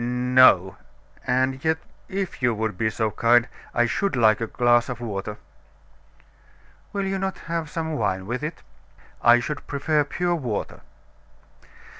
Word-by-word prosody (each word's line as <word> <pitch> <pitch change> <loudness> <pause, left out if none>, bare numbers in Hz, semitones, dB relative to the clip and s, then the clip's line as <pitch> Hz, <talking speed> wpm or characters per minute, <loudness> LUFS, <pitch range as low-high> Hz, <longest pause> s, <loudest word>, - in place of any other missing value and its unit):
"No 125 -6 +4 0.5
and 130 +1 0
yet 160 0 +2 0.3
if 190 -6 -4
you 120 -2 +2
would 110 -2 -2
be 110 +4 0
so 110 0 -1
kind 120 +2 +3 0.2
I 120 - +2
should 195 - -1
like 110 -3 +4
a 115 - -1
glass 120 +1 +2
of 125 -2 -5
water." 105 -2 -5 1.5
"Will 200 -1 -2
you 195 0 -2
not 190 0 -2
have 165 -2 -3
some 160 0 -3
wine 95 -8 -1
with 120 +6 -3
it?" 155 +2 -6 0.6
"I 120 0 +6
should 145 +4 -5
prefer 145 +2 +1
pure 175 +4 -1
water." 125 -11 -4
125 Hz, 145 wpm, -24 LUFS, 115-155 Hz, 1.5 s, I